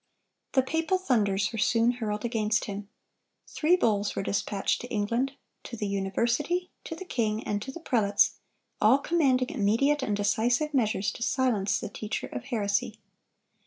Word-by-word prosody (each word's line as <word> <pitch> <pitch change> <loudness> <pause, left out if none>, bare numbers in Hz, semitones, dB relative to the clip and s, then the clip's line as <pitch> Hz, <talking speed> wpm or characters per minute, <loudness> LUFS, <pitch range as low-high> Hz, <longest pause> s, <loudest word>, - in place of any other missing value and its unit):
The 265 - +4
papal 325 +7 0
thunders 210 - +1
were 225 - -3
soon 230 +2 +3
hurled 220 -3 -3
against 220 -2 0
him. 200 0 -6 0.6
Three 330 +3 +2
bulls 210 - +1
were - - -2
dispatched 200 0 -1
to 245 - -7
England,—to 235 +3 -3
the 210 - -2
university, 235 - -1
to 325 - -5
the 375 - -8
king, 220 -8 -1
and 205 -1 -2
to 265 - -6
the 335 - -9
prelates,—all 215 0 +1
commanding 280 -4 +1
immediate 275 +4 +2
and 210 -5 -1
decisive 240 +8 +1
measures 215 -5 +1
to - - -11
silence 230 -6 +1
the - - -5
teacher 215 +1 -4
of - - -7
heresy. 205 -6 -1
230 Hz, 150 wpm, -28 LUFS, 205-270 Hz, 0.6 s, The